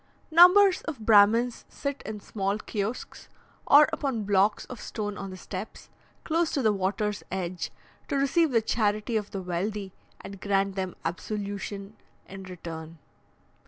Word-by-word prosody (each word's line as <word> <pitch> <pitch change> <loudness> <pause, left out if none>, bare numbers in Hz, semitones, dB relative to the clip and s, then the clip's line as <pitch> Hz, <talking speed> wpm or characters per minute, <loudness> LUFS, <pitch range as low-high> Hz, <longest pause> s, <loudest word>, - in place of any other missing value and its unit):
Numbers 365 +4 +7
of 300 -8 -5
Brahmins 225 +3 +5
sit 280 -1 -4
in 215 -1 -5
small 195 0 -2
kiosks, 215 +2 -5 0.4
or 295 +1 +8
upon 270 -8 -1
blocks 200 +1 +2
of 250 - -9
stone 205 -2 -4
on 195 -1 -6
the 185 - -8
steps, 190 +3 -8 0.3
close 330 0 +1
to 275 - 0
the 215 -1 +4
water's 205 +2 -1
edge, 180 -1 -3 0.4
to - - -2
receive 290 +4 +3
the 230 -4 +2
charity 215 +1 0
of 210 -2 -1
the 195 -2 -5
wealthy, 190 +2 -3 0.3
and 195 -1 -10
grant 195 -1 +1
them 190 -2 -4
absolution 200 +3 -5 0.3
in 195 0 -9
return. 165 -3 -8
205 Hz, 145 wpm, -27 LUFS, 195-235 Hz, 0.4 s, or